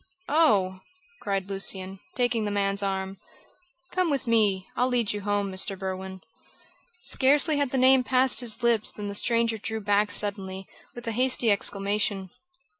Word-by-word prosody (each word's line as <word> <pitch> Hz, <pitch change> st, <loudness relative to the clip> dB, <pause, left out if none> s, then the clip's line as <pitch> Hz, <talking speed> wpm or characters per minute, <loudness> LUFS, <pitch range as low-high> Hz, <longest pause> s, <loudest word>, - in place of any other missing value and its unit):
"Oh!" 205 Hz, -, +2 dB, 0.4 s
cried 195 Hz, -2 st, -2 dB
Lucian, 195 Hz, -1 st, 0 dB, 0.2 s
taking 240 Hz, -3 st, 0 dB
the 210 Hz, -, -2 dB
man's 200 Hz, 0 st, 0 dB
arm. 195 Hz, -1 st, -3 dB, 0.7 s
"Come 365 Hz, -2 st, 0 dB
with 280 Hz, -2 st, -1 dB
me. 210 Hz, -5 st, +2 dB
I'll 250 Hz, -, +1 dB
lead 240 Hz, -5 st, 0 dB
you 205 Hz, -, -5 dB
home, 205 Hz, -1 st, -1 dB
Mr. 190 Hz, +1 st, 0 dB
Berwin." 190 Hz, 0 st, -6 dB, 0.8 s
Scarcely 290 Hz, +3 st, +3 dB
had 285 Hz, -2 st, 0 dB
the 265 Hz, -, -2 dB
name 260 Hz, 0 st, +5 dB
passed 255 Hz, +1 st, +2 dB
his 240 Hz, -1 st, -1 dB
lips 230 Hz, -2 st, +1 dB
than 205 Hz, -1 st, -6 dB
the -, -, -5 dB
stranger 230 Hz, +1 st, +1 dB
drew 220 Hz, +1 st, -4 dB
back 205 Hz, 0 st, +1 dB
suddenly, 195 Hz, -2 st, -3 dB, 0.3 s
with 240 Hz, -, -9 dB
a 230 Hz, -, -2 dB
hasty 245 Hz, -1 st, +2 dB
exclamation. 200 Hz, -1 st, -1 dB
205 Hz, 155 wpm, -26 LUFS, 195-245 Hz, 0.8 s, name